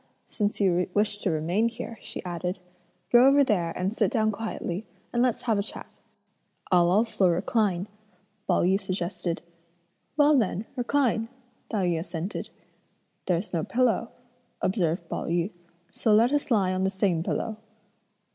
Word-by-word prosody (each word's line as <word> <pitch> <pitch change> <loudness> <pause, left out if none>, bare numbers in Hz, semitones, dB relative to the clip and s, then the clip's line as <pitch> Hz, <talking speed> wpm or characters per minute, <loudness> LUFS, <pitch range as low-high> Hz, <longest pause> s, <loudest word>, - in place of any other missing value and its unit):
since 205 -1 -2
you 180 -3 +2
wish 205 0 +1
to 200 - 0
remain 175 +8 +1
here," 230 -2 -7
she - - -7
added, 180 +1 -3 0.5
"go 245 +2 +7
over 280 +1 +6
there 180 -9 +1
and 185 +3 -1
sit 210 -4 +2
down 215 -1 +1
quietly, 210 -3 -4 0.3
and 240 - +2
let's 250 -2 +1
have 225 -4 +1
a - - +2
chat." 200 - -8 0.7
"I'll 175 -1 +5
also 200 -1 +3
recline," 185 +1 +1 0.6
Pao 180 - +3
yü 190 +3 +2
suggested. 180 -2 -3 0.7
"Well, 295 0 +6
then, 220 -4 +1
recline!" 245 -3 +1 0.4
Tai 200 -4 0
yü 170 -2 +1
assented. 170 +2 -5 0.8
"There's 180 +3 -1
no 165 -2 0
pillow," 240 +1 +1 0.5
observed 175 -3 0
Pao - - -4
yü, 170 +4 0 0.4
"so 215 -2 +2
let 235 +5 +4
us 290 -1 0
lie 195 -6 +2
on 185 0 0
the 190 - +2
same 190 -3 0
pillow." 215 +5 -2
200 Hz, 150 wpm, -27 LUFS, 180-225 Hz, 0.8 s, go